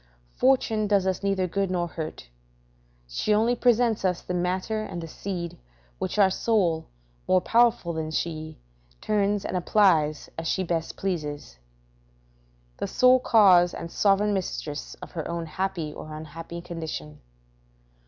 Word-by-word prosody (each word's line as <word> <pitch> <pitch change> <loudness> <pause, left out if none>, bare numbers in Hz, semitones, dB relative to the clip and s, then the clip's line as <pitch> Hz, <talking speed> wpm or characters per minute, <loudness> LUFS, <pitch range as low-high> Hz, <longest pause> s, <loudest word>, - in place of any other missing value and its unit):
Fortune 230 -5 +2
does 200 -2 +2
us 190 -1 -1
neither 195 -2 +1
good 195 +2 -1
nor 175 -2 0
hurt; 160 - -7 0.8
she 135 - 0
only 230 +3 +2
presents 240 -2 +2
us 180 -2 0
the 180 - -4
matter 185 +5 -1
and 185 -5 -5
the 165 - -6
seed, 175 0 -5 0.4
which - - -3
our 195 -2 +5
soul, 185 -7 +1 0.4
more 185 - +5
powerful 230 -5 +2
than 160 -1 -3
she, 155 -1 -3 0.4
turns 205 -1 0
and - - -3
applies 170 -5 +3
as 165 - -4
she 190 - 0
best 165 -2 -2
pleases; 150 - -4 1.2
the - - -3
sole 255 0 +5
cause 185 -7 +5
and 165 0 -7
sovereign 205 +1 +2
mistress 160 -6 -4
of - - -9
her 160 -4 -4
own 170 -1 -3
happy 170 -2 -3
or 155 0 -8
unhappy 165 +2 -8
condition. 160 -3 -6
180 Hz, 145 wpm, -26 LUFS, 165-205 Hz, 1.2 s, our